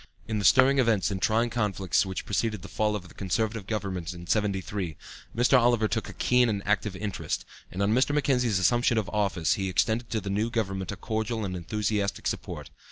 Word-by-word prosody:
In 110 -2 -1
the 100 - -2
stirring 130 +6 +6
events 110 -6 +2
and 95 -1 -3
trying 115 +3 +2
conflicts 100 -5 0
which 95 - -4
preceded 105 -2 -1
the - - -7
fall 105 -1 0
of 95 -3 -6
the - - -16
Conservative 105 +1 -2
Government 95 -5 -3
in 85 0 -9
'73, 95 -4 -1 0.4
Mr. 125 +2 +5
Oliver 120 -2 +3
took 110 0 -2
a - - -8
keen 125 -1 +3
and 100 -2 -2
active 105 -1 +1
interest; 100 0 -3 0.3
and 95 +2 -2
on 105 +2 +2
Mr. 130 +4 +3
Mackenzie's 130 -7 +2
assumption 120 +6 +3
of 105 -3 0
office 100 -6 +1
he 95 -1 -2
extended 110 +5 0
to 110 - -1
the 100 -1 -4
new 105 +3 0
government 95 -5 -2
a - - -4
cordial 110 +1 -2
and 95 -1 -4
enthusiastic 100 +3 -2
support. - - -4
105 Hz, 200 wpm, -27 LUFS, 95-115 Hz, 0.4 s, stirring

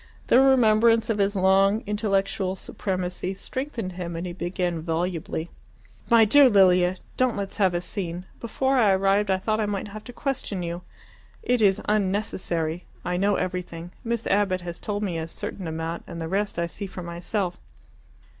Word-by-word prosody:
The 245 - +5
remembrance 230 -3 +4
of 210 - -2
his 200 +1 +2
long 195 +3 +3
intellectual 195 -2 0
supremacy 185 0 -3
strengthened 245 -3 -4
him, 175 -2 -5
and 170 +2 -4
he 175 - -5
began 175 -1 -2
volubly 165 0 -3 0.6
"My 230 -2 +7
dear 275 +5 +7
Lilia, 185 -3 +4 0.2
don't 255 -3 +2
let's 200 -1 -4
have 190 -4 +3
a 175 - 0
scene. 180 -1 -4
Before 265 +4 0
I 210 -5 +5
arrived 195 +2 +2
I 190 - +3
thought 215 +3 -1
I 215 - 0
might 205 0 -3
have 215 +1 -9
to 245 - -8
question 235 -9 -3
you. 170 +1 -4 0.6
It 245 -1 +2
is 200 -1 +4
unnecessary. 185 -5 -1 0.2
I 180 - -1
know 200 +2 +2
everything. 175 -2 -4
Miss 235 -1 -2
Abbott 195 -2 +1
has 175 0 -7
told 205 0 -3
me 175 -5 -2
a 160 - -4
certain 180 +2 -6
amount, 160 +1 -4
and 170 -1 -7
the 165 - -3
rest 200 +3 -1
I 170 - +1
see 195 +4 -6
for 185 -1 -8
myself." 175 +2 -3
195 Hz, 175 wpm, -25 LUFS, 175-215 Hz, 0.6 s, My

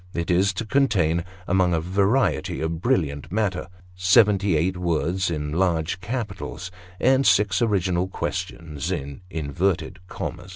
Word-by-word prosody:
It 85 +1 -1
is 95 +3 +3
to 115 +4 -4
contain, 100 - +2 0.2
among 90 -1 +2
a - - +1
variety 100 +9 +1
of 80 +1 -3
brilliant 80 - 0
matter, 100 -3 -1 0.3
seventy 95 0 +4
eight 90 +4 0
words 90 +1 0
in 75 -3 -3
large 85 0 0
capitals, 100 -4 -5 0.3
and 130 +2 +4
six 100 -5 +3
original 95 -5 +1
quotations 80 -4 -4
in 70 -2 -4
inverted 90 +4 -1
commas. 90 0 -6
90 Hz, 130 wpm, -24 LUFS, 85-100 Hz, 0.3 s, seventy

